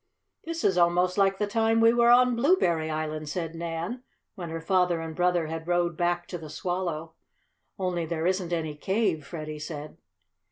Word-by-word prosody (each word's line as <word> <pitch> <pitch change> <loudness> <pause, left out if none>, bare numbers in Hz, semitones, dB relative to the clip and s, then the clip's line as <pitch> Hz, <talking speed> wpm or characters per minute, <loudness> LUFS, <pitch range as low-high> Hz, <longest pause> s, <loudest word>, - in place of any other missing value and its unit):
"This 330 0 -4
is 185 -2 +3
almost 175 +1 +3
like 195 -1 +3
the 210 - 0
time 225 +2 +2
we 230 0 +6
were 235 0 +4
on 250 0 +6
Blueberry 230 - +2
Island," 155 -1 -3
said 165 +1 -3
Nan, 170 +8 -4 0.3
when 175 -5 -7
her 165 0 -4
father 180 0 +2
and 160 -1 -6
brother 180 -1 +2
had 160 +1 -6
rowed 175 -1 +1
back 175 +1 0
to 175 - -5
the 155 -1 -9
Swallow. 170 -1 -3 0.6
"Only 180 -4 -2
there 165 0 -2
isn't 185 -1 0
any 160 -3 -2
cave," 190 -1 0
Freddie 155 0 -7
said. 150 -1 -7
175 Hz, 175 wpm, -27 LUFS, 160-190 Hz, 0.6 s, we